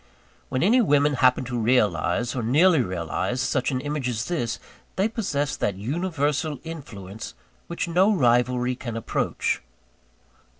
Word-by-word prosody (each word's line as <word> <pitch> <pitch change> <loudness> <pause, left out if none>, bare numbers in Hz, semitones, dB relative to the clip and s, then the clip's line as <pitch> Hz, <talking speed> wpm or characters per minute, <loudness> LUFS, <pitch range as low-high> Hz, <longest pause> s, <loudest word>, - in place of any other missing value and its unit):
When 130 - 0
any 235 +7 +5
women 145 -7 +3
happen 130 -1 +3
to 120 -1 -3
realise, 110 -1 +1
or 125 - -1
nearly 155 +9 +4
to 125 - +1
realise, 95 +6 -2
such 130 -1 0
an 130 -3 -1
image 145 -3 -2
as 115 0 -2
this, 120 -10 -2 0.4
they 195 +3 +2
possess 150 -11 -2
that 100 - -1
universal 150 - -1
influence 110 - -8 0.3
which 170 +1 -3
no 185 +5 +4
rivalry 125 - +2
can 120 -2 -6
ever - - -2
approach. - - -1
130 Hz, 145 wpm, -24 LUFS, 120-160 Hz, 0.4 s, any